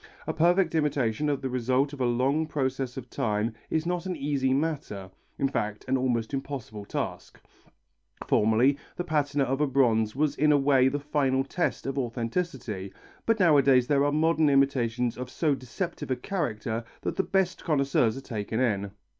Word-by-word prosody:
A - - -2
perfect 175 +1 +3
imitation 145 -3 0
of 140 -2 -1
the 130 - -1
result 130 +3 +1
of 140 - -6
a 125 - +2
long 135 +6 +1
process 130 -3 -2
of 130 -2 -6
time 110 +1 -1 0.2
is 160 0 0
not 180 +1 -2
an 180 - -2
easy 140 -3 0
matter, 135 -10 -2 0.3
in 135 - +1
fact 105 -5 -3
an 130 - +2
almost 125 -2 0
impossible 135 -7 -5
task. - - -5 0.9
Formerly 115 +6 +3 0.2
the 175 - -3
patina 145 -4 0
of 135 +2 -1
a 150 - +3
bronze 115 -5 +2
was 150 +1 +1
in 150 +2 +3
a 145 - +5
way 135 -2 +4
the 145 +2 0
final 140 -2 +1
test 170 +6 -2
of 135 +1 -2
authenticity, 120 - -3 0.4
but 225 -1 +3
nowadays 140 -7 +5
there 140 +1 +2
are 145 - +2
modern 155 0 +3
imitations 125 -4 +1
of 125 0 -5
so 150 +2 +1
deceptive 145 +4 -5
a 130 - +1
character 115 - -3 0.2
that - - -3
the - - +2
best 190 -1 0
connoisseurs 140 -6 +1
are - - -6
taken 110 -2 -4
in. 100 -6 0
135 Hz, 175 wpm, -27 LUFS, 120-150 Hz, 0.9 s, a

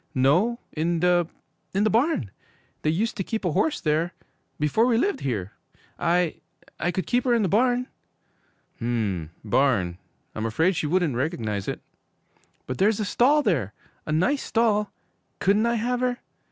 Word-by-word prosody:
'No, 170 - +3
in 165 +2 0
the 175 -1 +3 0.5
in 200 - +3
the 215 - +3
barn! 230 - +1 0.5
They 155 - +1
used 215 +10 0
to 195 - -1
keep 220 +1 -3
a 175 - +1
horse 250 - +1
there 160 +3 0 0.5
before 150 - +2
we 235 -2 +3
lived 395 - +1
here! 105 -8 -3 0.5
I 175 -1 +1 0.4
I 175 - 0
could 180 +1 -2
keep 245 0 +1
her 245 -2 +3
in 230 - +2
the - - +2
barn!' 245 +5 +2 0.9
'M 115 -7 -1
m, 80 - -9 0.2
barn? 100 -11 +2 0.3
I'm 110 +1 -2
afraid 160 - +2
she 150 - -1
wouldn't 170 -4 +1
recognize 115 - -2
it.' - - -3 0.8
'But 130 - -5
there's 210 +2 +3
a 210 - 0
stall 285 +8 +3
there! 135 - 0 0.3
A - - -2
nice 220 - +2
stall! 215 -2 +1 0.5
Couldn't 205 +4 +2
I 235 - +1
have 245 +2 0
her?' 250 -1 0
180 Hz, 165 wpm, -25 LUFS, 140-230 Hz, 0.9 s, No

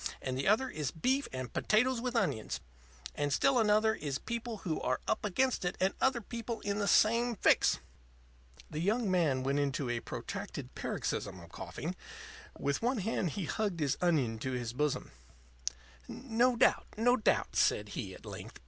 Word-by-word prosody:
And 130 -1 -3
the 135 - -1
other 220 +6 +4
one 260 - -7
is 150 -4 -2
beef 260 - 0
and 130 -1 -5
potatoes 240 +3 +2
with 250 0 -2
onions. 110 - 0 0.5
And 145 0 -1
still 270 - +4
another 215 0 +4
one 220 - -5
is 140 -3 -2
people 235 - -4
who 160 -3 -1
are - - 0
up - - 0
against 255 +5 +1
it 180 - -2
and 190 +1 +2
other 265 -3 +3
people 230 +1 -5
in 205 0 -1
the 200 - 0
same 230 +3 +4
fix." - - +4 0.9
The 150 - -3
young 210 +4 +1
man 155 -8 +2
went 140 +2 +1
into 140 -2 0
a 120 - -1
protracted - - -6
paroxysm - - -3
of - - -13
coughing. - - -5 0.6
With 140 0 -1
one 245 +3 +1
hand 200 -3 0
he 195 - -3
hugged 200 -1 -1
his 145 -3 +1
onion 140 -11 +2
to 130 +3 -3
his 120 -2 -3
bosom. 150 +2 -1 1.0
"No 245 0 +1
doubt; - - +3
no 245 +3 +4
doubt," 220 - +1
said - - +3
he, - - -5
at - - -14
length. - - -8
200 Hz, 180 wpm, -32 LUFS, 145-235 Hz, 1.0 s, other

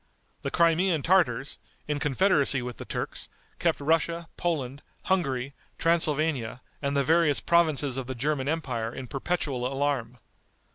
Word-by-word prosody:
The - - -2
Crimean 170 -1 +2
Tartars, 145 -8 +2 0.3
in 150 -1 -1
confederacy 145 -3 +3
with 125 -1 -6
the - - -7
Turks, - - -4 0.3
kept 165 -4 +1
Russia, 165 +3 0
Poland, 145 -5 -2 0.2
Hungary, 140 -8 0 0.2
Transylvania, 155 -7 +1 0.2
and 140 0 0
the 140 - +3
various 160 0 +3
provinces 155 -6 +2
of 130 -2 -4
the 130 - -4
German 135 +2 -1
empire 130 -8 -2
in 130 +1 -7
perpetual 135 -2 -2
alarm. 135 -4 -1
145 Hz, 135 wpm, -27 LUFS, 130-165 Hz, 0.3 s, confederacy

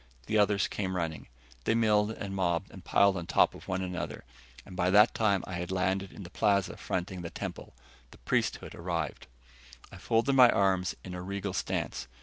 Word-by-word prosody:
The 110 - +1
others 105 -1 +3
came 95 -2 -3
running. 80 -3 -3 0.4
They 110 - +2
milled 105 -2 +3
and 100 -3 -5
mobbed 85 -3 0
and - - -12
piled 100 -1 +4
on 85 -3 -5
top - - +4
of - - -13
one 95 0 -1
another, 90 -2 -5 0.4
and 95 - -11
by 90 0 +1
that 105 +4 +6
time 100 -4 +2
I 95 - -7
had 90 0 -4
landed 95 +1 0
in 100 - -10
the 85 - -11
plaza 100 -1 +1
fronting 90 0 -3
the 85 - -5
temple. - - -7 0.3
The - - -16
priesthood - - -1
arrived. 85 -4 -4 0.6
I - - -10
folded 115 +4 +1
my 125 -2 +8
arms 95 -3 +2
in 90 - -7
a 90 - -5
regal 100 +1 -4
stance. 65 -7 -2
95 Hz, 190 wpm, -30 LUFS, 90-100 Hz, 0.6 s, my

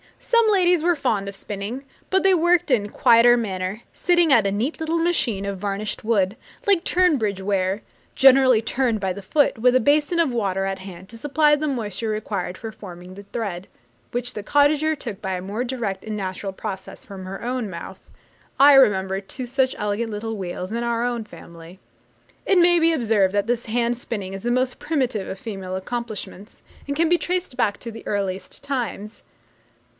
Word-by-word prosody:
Some 465 -2 +2
ladies 360 -4 +4
were 345 +1 +2
fond 215 -9 -1
of 200 - -8
spinning, 205 +7 -6 0.3
but 380 0 +2
they 385 0 +5
worked 345 -2 +3
in 220 -5 +3
a - - -7
quieter 235 +3 +5
manner, 195 -1 -3
sitting 345 -3 +2
at 220 -6 +4
a - - 0
neat 230 +10 -2
little 320 +1 -1
machine 270 - 0
of 200 -1 -4
varnished 200 +1 -3
wood, 205 -3 +1 0.3
like 395 -5 +3
Tunbridge 275 - +1
ware, 195 0 0 0.3
generally 265 -3 +6
turned 240 -2 0
by 190 -2 -1
the 200 - -8
foot, 275 +5 +1
with 250 +2 +4
a - - +6
basin 295 +6 +2
of 325 -6 +2
water 195 -4 -1
at 195 0 -3
hand 190 -1 -10
to 230 - -10
supply 295 +4 +3
the 305 +1 -2
moisture 225 -5 -3
required 200 -4 -3
for 225 - -7
forming 180 -4 -11
the 200 +2 -10
thread, 195 -6 -4 0.4
which 245 +1 -3
the 210 - -5
cottager 290 +6 +2
took 210 -7 -7
by 190 -2 -3
a 180 - -3
more 205 +6 -3
direct 235 -7 -3
and 215 -1 -4
natural 190 0 -4
process 195 -1 -7
from 190 -2 -9
her 195 +3 -7
own 245 -3 -2
mouth. 170 - -8 0.6
I 285 +1 +8
remember 195 -7 +4
two 250 +6 -6
such 260 +1 0
elegant 210 +2 -2
little 220 +1 -4
wheels 185 0 -5
in 235 +1 -2
our 235 0 0
own 240 -2 -2
family. 170 -2 -13 0.7
It 390 - +3
may 350 0 +5
be 330 0 +4
observed 215 -8 +2
that 205 +1 +1
this 240 0 -1
hand 235 +1 0
spinning 205 -6 -5
is 195 - -6
the 240 - -2
most 255 +1 0
primitive 255 -10 -1
of 190 - -6
female 195 -4 -6
accomplishments, 215 -1 -6 0.2
and 280 - -2
can 325 +2 +2
be 350 0 +3
traced 360 -6 -2
back 210 -5 +1
to 235 - -6
the 225 - -11
earliest 195 0 -3
times. 235 -6 -4
225 Hz, 190 wpm, -23 LUFS, 195-270 Hz, 0.7 s, I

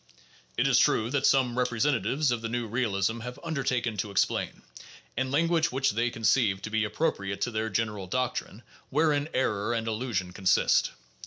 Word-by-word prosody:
It - - +2
is - - +4
true 110 +2 +2
that 140 -1 +2
some 125 -2 +2
representatives 125 +3 +1
of 120 -2 -1
the 115 - -3
new 120 0 -2
realism 110 -2 -1
have 125 +3 -7
undertaken 125 -8 -1
to 100 +2 -2
explain, 100 - -1 0.5
in 130 +2 -1
language 165 +3 +2
which 135 +1 +1
they 115 +3 0
conceive 110 -2 +2
to 105 - -5
be 110 0 +1
ap - - -13
propriate 100 -11 -1
to 120 - 0
their 110 0 -2
general 105 -2 -2
doctrine, 125 0 -3 0.3
wherein 150 0 +1
error 105 -5 0
and 115 -1 -2
illusion 110 -5 -2
con 95 0 -5
sist. - - +4
120 Hz, 175 wpm, -28 LUFS, 110-130 Hz, 0.5 s, is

